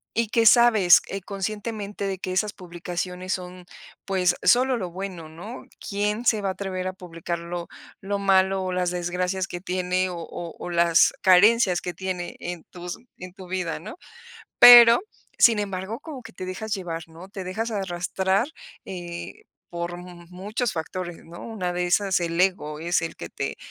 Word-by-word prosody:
y 230 0 +1
que 225 +2 +2
sabes, 220 -6 +7
eh, 195 - -5
conscientemente 205 +1 -4
de 190 -2 -3
que 185 - -4
esas 210 +3 0
publicaciones 180 +1 -5
son, 180 0 -7 0.4
pues, 180 -2 +1
solo 255 +1 +4
lo 185 -5 -5
bueno, 180 -3 -7
¿no? 190 +10 -9
¿Quién 210 +3 -2
se 220 -3 +3
va 195 - -1
a - - 0
atrever 185 -1 -4
a 185 - -3
publicar 170 -2 -6
lo 170 0 -6 0.3
lo 200 +1 -2
malo, 190 -1 +3
o 185 - -2
las 180 -1 0
desgracias 180 +2 -2
que 175 - -6
tiene, 185 0 -1
o 175 - -6
o 165 0 -7
o, - - -6
las 170 -1 +4
carencias 195 0 +5
que 180 - -4
tiene 185 -1 -4
en 175 -2 -6
tus 175 -1 -8 0.2
en 180 0 -9
tu 185 -1 -12
vida, 180 -2 -3
¿no? 210 +8 -9 0.6
Pero, 240 -1 +10 0.4
sin 230 -2 +6
embargo, 200 +3 -4
como 300 -4 -8
que 230 -1 -12
te 185 - -7
dejas 205 +4 -4
llevar, 165 -4 -5
¿no? 165 +3 -13
Te 195 -1 -7
dejas 220 +6 -3
arrastrar, 190 +1 -1 0.4
eh, 175 - -7 0.3
por 175 0 -4
mu 175 -1 -11
muchos 210 +6 -3
factores, 175 +1 -5
¿no? 170 +1 -11
Una 195 -6 -3
de 180 0 -1
esas, 190 +1 +2
el 170 0 -1
ego, 180 -5 0
es 175 +1 +1
el 165 - -4
que - - -7
te - - -4
185 Hz, 175 wpm, -24 LUFS, 175-200 Hz, 0.6 s, Pero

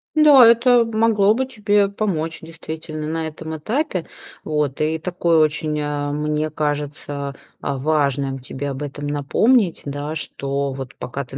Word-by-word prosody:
Да, 295 -5 +8
это 235 +1 +6
могло 220 -2 +3
бы 260 +3 0
тебе 205 -5 +2
помочь, 175 -6 -2
действительно, 160 -1 -7
на 160 0 -2
этом 160 +1 -7
этапе. 210 - -2 0.4
Вот, 150 -3 -1
и 155 +1 +1
такой 170 -1 +1
очень, 155 0 +1
а, 145 -1 -2
мне 150 +1 -1
кажется, 145 -2 -3 0.3
а, 140 - -2
важным 140 -2 0
тебе 135 +2 -5
об 135 +2 -5
этом 145 0 -5
напомнить, 170 - +2
да, 145 +2 -4
что 140 -2 -3
вот 130 -1 -7
пока 140 +3 -5
ты 135 +2 -9
155 Hz, 150 wpm, -21 LUFS, 145-195 Hz, 0.4 s, Да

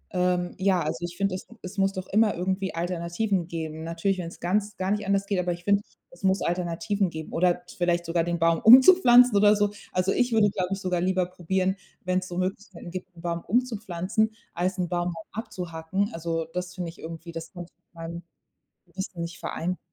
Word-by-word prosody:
ähm, 180 -1 +1
ja, 190 -2 +3
also 155 +3 -3
ich 175 0 -5
finde, 195 -1 0
es 185 - -6 0.2
es 190 +2 -6
muss 195 0 +3
doch 185 0 -5
immer 215 0 +3
irgendwie 190 +1 -2
Alternativen 175 +2 -1
geben. 160 -2 -5
Natürlich, 170 +3 -1
wenn's 170 -1 -6
ganz 205 +4 -1
gar 190 +1 -1
nicht 210 -1 -1
anders 200 0 +2
geht, 200 -2 0
aber 175 -1 0
ich 175 0 -10
finde, 200 +1 +3 0.3
es 175 - -17
muss 190 -1 +2
Alternativen 180 +3 0
geben 160 -1 -7
oder 180 +1 +2 0.2
vielleicht 175 0 +1
sogar 165 0 +1
den 170 0 -1
Baum 165 0 +3
umzupflanzen 250 - +8
oder 210 +1 +6
so. 205 0 +1 0.2
Also 185 +1 +1
ich 245 -1 +1
würde, 210 -3 +4
glaube 185 -3 -2
ich, 195 - -3
sogar 180 -2 0
lieber 185 0 +1
probieren, 190 +2 0 0.3
wenn's 185 0 0
so 175 - -6
Möglichkeiten 185 -1 -4
gibt, 185 0 -6
'n - - -11
Baum 170 -1 -2
umzupflanzen, 220 -3 0 0.2
als 185 +2 -1
'n 180 -1 0
Baum 175 0 -1 0.2
abzuhacken. 185 -1 -3
Also, 165 0 -2
das 180 0 -4
finde 175 -2 -4
ich - - -20
irgendwie, 165 +1 -8
das 165 0 -7
könnte 175 -2 -9
ich - - -50
mit - - -44
meinem 165 +1 -7 0.6
Gewissen 175 0 -6
nicht 170 0 -6
vereinbaren. 180 +2 -3
180 Hz, 200 wpm, -26 LUFS, 170-195 Hz, 0.6 s, umzupflanzen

